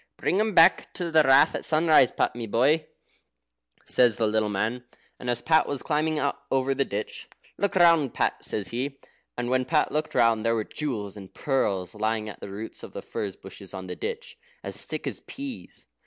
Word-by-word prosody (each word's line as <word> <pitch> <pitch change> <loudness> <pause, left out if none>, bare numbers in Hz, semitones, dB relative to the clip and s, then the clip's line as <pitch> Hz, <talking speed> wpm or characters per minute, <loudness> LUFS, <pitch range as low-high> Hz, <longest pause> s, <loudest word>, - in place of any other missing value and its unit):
"Bring 190 - 0
'em 215 -2 0
back 165 +2 +5
to 175 -2 -3
the 160 -1 +6
Rath 135 +2 +5
at - - -4
sunrise, 155 -5 +5
Pat, - - 0
my 120 -2 -5
boy," 145 +9 +2 1.0
says 120 -4 +3
the 115 - 0
little 110 0 +1
man. 110 +5 -2 0.4
And 125 - -5
as 120 -1 -1
Pat 160 -1 +3
was 140 -2 -3
climbing 155 0 0 0.3
over 135 0 +1
the 140 +1 +1
ditch, 105 +2 -5 0.3
"Look 200 -1 0
round, 165 -7 +4
Pat," - - -1
says 105 -3 +1
he. 135 +4 -3 0.4
And 120 0 -2
when 130 0 +2
Pat 150 +4 +1
looked 155 +1 -2
round, 115 -2 +3
there 115 0 +2
were 110 - -1
jewels 110 -8 -4
and 95 -2 -11
pearls 100 -10 -1
lying 110 0 -1
at - - -10
the - - -8
roots 105 +3 -7
of - - -10
the - - -7
furze 100 -3 -5
bushes 95 0 -11
on 95 0 -6
the - - -6
ditch, 470 +2 -6 0.2
as - - -1
thick - - -6
as - - -3
peas. 275 -3 -8
130 Hz, 200 wpm, -26 LUFS, 110-155 Hz, 1.0 s, the